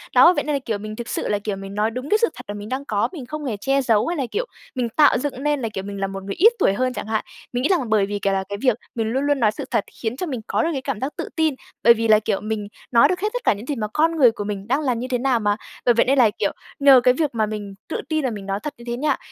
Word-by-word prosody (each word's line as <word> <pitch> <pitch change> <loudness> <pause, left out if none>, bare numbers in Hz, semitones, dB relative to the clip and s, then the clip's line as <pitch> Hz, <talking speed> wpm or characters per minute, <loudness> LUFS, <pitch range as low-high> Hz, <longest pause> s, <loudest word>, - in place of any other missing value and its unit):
Đó, 345 - +8
vậy - - -1
nên 300 -1 -1
là, - - 0
kiểu, 230 -5 -3
mình 215 +1 -7
thực 240 +1 -6
sự - - -2
là, 205 - 0
kiểu, 205 -1 -3
mình 195 0 -8
nói 215 +2 +1
đúng 255 +5 -6
cái 425 - +5
sự 465 +1 +3
thật - - -10
mà 205 - -4
mình 205 +1 -7
đang 265 +2 -3
có, 205 -4 0
mình 305 -9 -8
không 305 +3 -6
hề 230 -6 -2
che 270 +6 +1
giấu, 225 -5 +2
hay 345 0 -1
là, 275 - 0
kiểu, 460 +4 -1 0.3
mình 245 -2 -1
tạo 295 +6 +4
dựng 270 0 -4
nên 295 -2 +1
là, 225 - -2
kiểu, 190 - -4
mình 200 0 -6
là 195 - +1
một 195 0 -7
người 195 0 -5
ít 445 +7 +6
tuổi 195 - +3
hơn 255 +5 0
chẳng - - -5
hạn. 220 -1 -1 0.3
Mình 245 +1 -1
nghĩ - - +2
rằng 320 - +1
bởi 215 -2 +3
vì 205 +1 -3
cà 200 0 +1
là 190 0 0
cái 200 - -3
việc 250 -4 +3 0.2
mình 225 -2 -1
luôn 265 +3 0
luôn 290 -1 +1
nói 215 -4 +3
sự - - -6
thật 205 - +2 0.2
khiến 225 +2 -2
cho 365 - -2
mình 260 -8 -4
có - - +1
được 330 - +1
cái 270 - -2
cảm 265 -5 -3
giác 270 +5 -3
tự - - -4
tin, 315 -3 +2 0.3
bởi 235 - +8
vì 230 0 -1
là, 215 -1 +6
kiểu, 205 -2 -1
mình 215 -1 -3 0.2
nói 240 +3 +6
được 360 +3 -1
hết 420 +3 0
tất - - -3
cả - - +4
những 205 +3 -9
gì 290 - -2
mà 215 -4 -2
con 325 +2 +2
người 260 -7 +6
của 210 - -5
mình 200 -1 -5
đang 270 +5 +1
là 265 -4 +1
như 240 +2 -4
thế 255 -1 0
nào 250 -1 +1
mà. 205 -1 +1 0.3
Bởi 240 - +6
vậy 235 - +3
nên 275 +2 +2
là, 235 -3 +6
kiểu, 210 -1 -1 0.3
nhờ 275 -3 +7
cái 250 0 +5
việc 300 +3 0
mà 220 -1 +2
mình 210 -2 -6 0.2
tự - - -2
tin 310 -2 0
là - - +1
mình 205 -3 -7
nói 195 0 -2
thật 300 - -4
như 235 - -13
thế 240 0 -2
nha, 290 +1 +1
240 Hz, 340 wpm, -22 LUFS, 210-280 Hz, 0.3 s, Đó